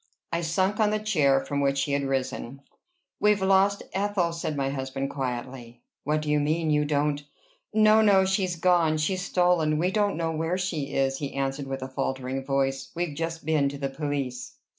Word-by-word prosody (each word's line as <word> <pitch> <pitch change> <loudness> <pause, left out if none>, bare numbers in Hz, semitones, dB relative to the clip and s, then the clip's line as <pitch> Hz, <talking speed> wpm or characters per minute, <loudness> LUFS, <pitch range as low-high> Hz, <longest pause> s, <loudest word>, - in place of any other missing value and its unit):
I 170 - 0
sunk 185 +6 0
on 215 -1 +4
the 215 - +1
chair 155 -11 +2
from 140 +1 -2
which 140 0 +1
she 140 +1 0
had 140 0 +1
risen. 135 0 -3 0.6
"We've 210 0 +3
lost 195 +1 +3
Ethel," 195 -3 0
said 155 -3 -3
my 135 -1 0
husband 135 0 -3
quietly. 125 -2 -5 0.2
"What 150 +1 0
do 150 - -3
you 150 - +3
mean? 155 +2 0
You 150 0 +2
don't" 145 0 0 0.5
"No, 215 0 +5
no: 195 -3 +5
she's 190 -2 0
gone; 170 -2 +3
she's 185 +5 0
stolen. 175 -4 +2
We 180 +4 +1
don't 205 -3 +1
know 165 -1 -1
where 160 +3 -1
she 160 -7 -3
is," 135 0 +1
he 140 -2 -5
answered 135 0 -2
with 135 -1 -4
faltering 130 0 -2
voice. 135 0 -1
"We've 170 -3 -2
just 165 0 -4
been 150 -3 +2
to 140 - -7
the 140 -1 -2
police." 140 -3 -4
150 Hz, 185 wpm, -26 LUFS, 135-180 Hz, 0.6 s, No